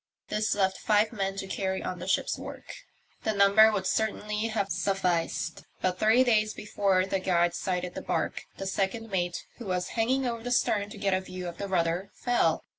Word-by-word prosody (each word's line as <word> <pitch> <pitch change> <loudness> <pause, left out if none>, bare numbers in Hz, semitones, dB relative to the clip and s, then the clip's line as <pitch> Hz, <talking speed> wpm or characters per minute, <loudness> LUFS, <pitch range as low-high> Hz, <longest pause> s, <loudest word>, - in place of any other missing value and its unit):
This 215 0 0
left 190 -2 +1
five 215 +2 +2
men 195 -3 -2
to 195 - -4
carry 190 0 -2
on 180 - -4
the 180 - -6
ship's 190 - +1
work. - - -8 0.5
The 220 - 0
number 200 +2 +6
would 195 -3 -2
certainly 210 +1 0
have 205 -3 -1
sufficed, 175 -4 0 0.2
but 185 0 -1
three 225 +4 +5
days 215 -3 +2
before 195 -3 +1
the 195 0 -1
Guide 175 -2 +2
sighted 180 -1 -2
the - - -5
barque - - -2
the 195 - -5
second 200 +3 -2
mate, 175 -2 -1
who 235 - -8
was 180 -1 -1
hanging 255 +4 +1
over 235 -2 -2
the 245 - -4
stern 205 -4 +1
to 210 - -10
get 200 -1 0
a 185 - +1
view 185 -1 -7
of 170 -1 -7
the 200 - -3
rudder, 175 +1 0
fell. 240 -10 +1
195 Hz, 195 wpm, -28 LUFS, 185-215 Hz, 0.5 s, number